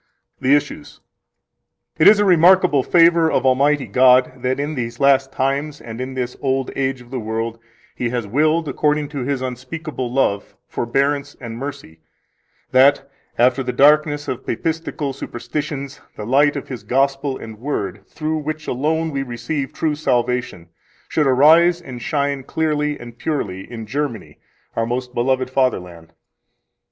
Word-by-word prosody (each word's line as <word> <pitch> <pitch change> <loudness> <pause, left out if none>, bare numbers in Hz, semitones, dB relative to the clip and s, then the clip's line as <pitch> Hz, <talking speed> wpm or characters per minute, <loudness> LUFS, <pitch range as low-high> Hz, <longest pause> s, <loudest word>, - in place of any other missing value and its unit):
The 135 +3 +4
Issues 145 - -4 1.0
2 - - -6
It - - +7
is 210 - +8
a 205 - +3
remarkable 180 -4 +5
favor 165 +1 +4
of - - +1
Almighty 140 +2 +3
God 125 +3 +4
that 130 +2 -1
in 145 +2 -2
these 120 -3 -4
last 135 -1 +3
times 140 +3 -2
and 115 +1 -8
in 130 +1 -5
this 125 -1 -3
old 135 -2 -1
age 135 -1 -1
of 120 - -17
the 130 - -3
world 115 +1 -3 0.3
He 120 - -2
has 120 -2 -2
willed, 155 +8 +1
according 150 +1 0
to 145 -2 -5
His 130 0 -2
unspeakable 130 +1 -5
love, 110 -6 0
forbearance, 140 +4 -1
and 115 -3 -7
mercy, 135 - -7 0.7
that 135 +1 +4 0.3
after 125 +2 +3
the 125 -1 -2
darkness 145 +1 +3
of 130 - -4
papistical 160 +1 -3
superstitions 140 +1 -5
the 105 - -6
light 145 +5 +3
of 140 - -5
His 125 -5 -6
Gospel 135 +4 0
and 110 -1 -10
Word, 105 -7 -4
through 155 0 -3
which 155 +1 -5
alone 160 +5 -1
we 140 -1 -2
receive 135 +2 -4
true 155 -2 -1
salvation, 125 - -1 0.4
should 150 -3 +1
arise 160 +6 +5
and 130 -8 -9
shine 140 -2 -1
clearly 150 +1 -1
and 120 0 -11
purely 100 -11 -3
in 115 -2 -6
Germany, 130 -3 -4 0.4
our 115 0 0
most 125 +1 -3
beloved 130 +1 0
fatherland. 90 -11 -1
135 Hz, 155 wpm, -20 LUFS, 125-150 Hz, 1.0 s, is